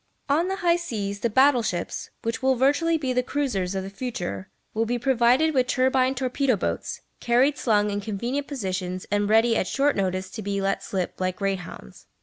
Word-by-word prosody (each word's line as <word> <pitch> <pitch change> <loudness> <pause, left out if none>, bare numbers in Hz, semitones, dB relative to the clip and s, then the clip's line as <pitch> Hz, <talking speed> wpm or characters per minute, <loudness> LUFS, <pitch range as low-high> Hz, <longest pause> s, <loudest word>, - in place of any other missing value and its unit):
On 305 +5 +2
the 385 - -1
high 340 0 +5
seas 205 -12 -4
the 235 - 0
battle 260 +2 +5
ships, 175 -6 -3
which 230 +2 -2
will 265 0 +3
virtually 290 +6 +2
be 265 -4 -2
the 250 - +2
cruisers 245 -9 -2
of 190 - -2
the 190 - -6
future, 195 - -5 0.2
will 225 +1 0
be 245 +1 0
provided 255 +5 +3
with 255 -2 +2
turbine 260 0 +2
torpedo 260 0 +1
boats, 195 - -3 0.2
carried 255 +5 +3
slung 210 -5 +1
in 205 0 -2
convenient 235 +8 -3
positions 185 -8 -3
and 205 0 +1
ready 225 +2 +4
at - - 0
short 280 +1 +1
notice 185 0 -2
to 220 - -6
be 200 -1 -2
let 195 0 0
slip 185 -1 -4
like 185 0 0
greyhounds. 190 - -5
235 Hz, 190 wpm, -25 LUFS, 195-265 Hz, 0.2 s, high